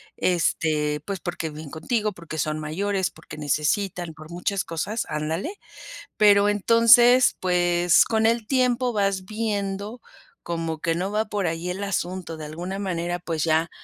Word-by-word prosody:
este, 155 -4 0
pues 195 -2 -4
porque 175 -3 -4
viven 150 -1 -9
contigo, 215 - -1
porque 165 -3 -8
son 155 +1 -1
mayores, 190 +5 -1
porque 155 - -12
necesitan, 160 +4 -1
por 155 0 -13
muchas 190 +2 -2
cosas, 195 +7 -3
ándale. 160 - -3 0.6
Pero 205 -1 +5
entonces, 230 +4 +6
pues 175 -1 +3
con 220 -1 +1
el 230 -1 +1
tiempo 250 -1 +1
vas 195 -2 0
viendo 210 0 -3 0.4
como 165 -2 -3
que 165 0 0
no 185 +4 -2
va 215 +1 +1
por 205 -3 -2
ahí 165 +2 -3
el 190 +3 -4
asunto 180 -3 -3
de 155 - -7
alguna 175 +6 -5
manera 175 -3 -2
pues 165 -3 -3
ya 160 0 +1
180 Hz, 150 wpm, -24 LUFS, 160-205 Hz, 0.6 s, entonces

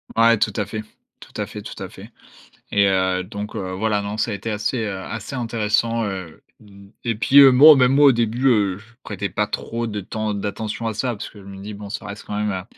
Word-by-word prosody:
Ouais, 115 0 +5
tout 105 - 0
à 105 - -1
fait, 110 +1 -5 0.4
tout - - -15
à - - -2
fait, - - -9
tout - - -9
à - - -7
fait - - -13 0.6
et 100 -1 +4
heu, 95 -1 +1
donc, 100 +2 -7
heu, 95 -1 -4
voilà, 105 +2 0
non, 100 +1 -5
ça 110 +1 0
a - - -2
été 100 +3 -5
assez, 105 +4 -1
heu, 100 -2 -4
assez 115 +7 -6
intéressant, 115 -1 0
heu, 95 -5 -6 0.2
mmh 100 -1 -16
et 115 -2 -1
puis, 135 +6 +5
heu, 135 -1 +9
bon, 145 +5 +9
même 130 0 +4
moi 145 +1 +5
au 135 - +8
début, 120 +2 0
heu, 100 -7 +2
je 105 - -17 0.2
prêtais 100 -1 -4
pas 105 - 0
trop 115 +2 -4
de 105 -1 -4
temps 110 +2 -3
d'attention 105 +3 -4
à 110 - -2
ça 125 +4 -2
parce 105 - -7
que 105 - -15
je 100 - -14
me 95 0 -10
dis: 105 +1 -7
«Bon, 100 0 -9
ça 105 - -6
reste 100 +1 -8
quand 105 - -5
même, 105 0 0
heu» 95 -2 -4
105 Hz, 255 wpm, -21 LUFS, 100-115 Hz, 0.6 s, heu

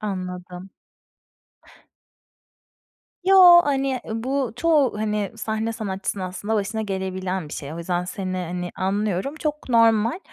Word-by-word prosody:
Anladım. 180 -2 -6 2.5
Yo, 365 -2 +9
hani, 270 -2 0
ııı, 225 +1 -4
bu 265 -2 -1
çoğu, 295 -9 +2
hani, 210 -2 -1
sahne 220 +1 -2
sanatçısının 195 -3 -4
aslında 205 +4 -3
başına 215 +2 -1
gelebilen 190 -3 -3
bir - - -11
şey. 140 +1 -6
O - - -7
yüzden 175 +1 -2
seni, 185 0 -4
hani, 180 0 -4
anlıyorum. 200 - -1
Çok 300 -3 -4
normal. 230 - +3
210 Hz, 120 wpm, -23 LUFS, 185-240 Hz, 2.5 s, Yo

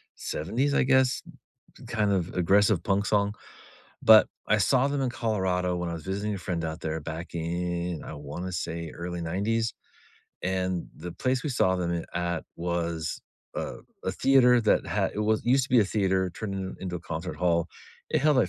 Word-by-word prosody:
‘70s, 125 - -1
I - - +4
guess, 130 -1 +3 0.7
kind 105 -2 +1
of 90 -2 -1
aggressive 95 +1 +3
punk 100 0 +1
song. 100 -1 +2 0.7
But 110 -1 +8 0.2
I 105 - +3
saw 125 +6 +3
them 140 0 -1
in 130 -2 0
Colorado 95 -7 0
when 90 0 -2
I 85 - -3
was 80 - -7
visiting 100 +2 -2
a - - -4
friend 85 -2 -3
out 80 0 -4
there 80 0 -3
back 80 +3 -6
in, 85 0 -2
I - - -7
wanna 75 +5 -6
say 85 -1 -3
early 85 +1 -5
‘90s, 110 +7 0 0.7
and 95 -1 -1
the 90 - -7
place 130 +5 0
we 150 - -1
saw 95 -7 +2
them 85 -1 -1
in 85 -1 -2
at 85 -1 -1
was 85 -2 -2 0.3
a - - -3 0.3
a - - +1
theater 125 -2 +5
that 110 - +3
ha - - 0
it - - -2
was 110 0 +1
used 130 +3 +4
to - - -11
be 125 - +6
a - - +4
theater 95 -2 +1
turned 100 +3 -5
in 95 -1 -4
into 90 -2 -3
a - - -7
concert 85 +1 -5
hall, 85 0 +1 0.4
it - - +2
held, 150 0 +4
like, 110 -8 +3
95 Hz, 190 wpm, -27 LUFS, 85-110 Hz, 0.7 s, But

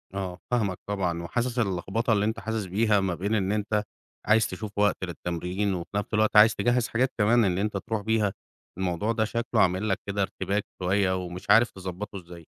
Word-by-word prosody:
آه، 90 -2 -4
فاهمك 105 -7 +1
طبعًا، 90 -4 -1
وحاسس 120 +6 -2
اللخبطة 100 +3 0
اللي 105 -1 +2
أنت 110 +1 -1
حاسس 110 -2 -3
بيها 105 +2 +2
ما 95 -3 -1
بين 100 +6 -1
إن 100 -2 0
أنت 105 0 0 0.4
عايز 110 +1 +4
تشوف 100 +2 -6
وقت 105 0 +3
للتمرين، 90 +3 -2
وفي 85 -2 -5
نفس 105 +1 -2
الوقت 110 0 +2
عايز 110 +2 +8
تجهز 120 -1 +1
حاجات 125 +3 +1
كمان 115 +2 +4
إن 90 -2 +1
أنت 105 0 -1
ترُوح 110 +2 -3
بيها. 110 -2 +1 0.4
الموضوع 95 +4 -1
ده 110 -1 +1
شكله 115 0 0
عامل 95 +4 +2
لك 95 - 0
كده 100 0 -1
ارتباك 100 +1 -1 0.2
شوية، 95 0 +2
ومش 90 +2 -9
عارف 115 +2 +6
تضبطه 95 +2 -6
إزاي. 85 -2 -11
100 Hz, 190 wpm, -27 LUFS, 95-110 Hz, 0.4 s, عايز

